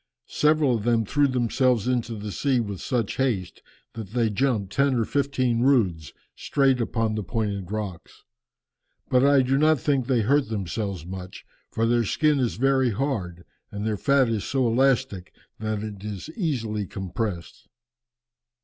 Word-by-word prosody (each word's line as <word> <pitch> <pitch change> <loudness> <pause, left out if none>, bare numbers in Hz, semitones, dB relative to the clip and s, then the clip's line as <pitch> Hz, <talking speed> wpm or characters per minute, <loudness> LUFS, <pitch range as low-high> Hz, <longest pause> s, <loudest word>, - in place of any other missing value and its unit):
Several 150 -4 +2
of 105 - -6
them 115 -1 +2
threw 145 +7 +2
themselves 125 -2 +1
into 120 -2 -1
the 105 0 -6
sea 135 +3 +1
with 100 -5 -4
such 120 -6 -2
haste, 115 -10 -1 0.3
that 110 -3 -7
they 115 -3 +1
jumped 105 -4 0
ten 140 -1 +2
or 115 -2 +1
fifteen 130 -4 0
roods, 95 - +2 0.2
straight 135 -3 +1
upon 115 -1 -1
the 110 - -2
pointed 100 -2 -3
rocks. 105 -5 -6 0.9
But 125 0 +4
I 140 -1 +5
do 135 +2 +1
not 155 -1 +4
think 135 -2 0
they 125 -4 +2
hurt 135 +5 +2
themselves 100 -3 -3
much, 95 0 -8 0.2
for 115 - -1
their 120 0 +2
skin 150 +6 +1
is 125 -3 0
very 130 0 +2
hard 100 -8 -3 0.3
and 105 +1 -5
their 110 -1 0
fat 140 +4 +3
is 110 -3 -1
so 135 -2 0
elastic 115 -6 +1 0.2
that 110 -1 -3
it 105 -2 -7
is 105 - -6
easily 115 - -2
compressed." 95 -1 -5
115 Hz, 160 wpm, -25 LUFS, 105-135 Hz, 0.9 s, I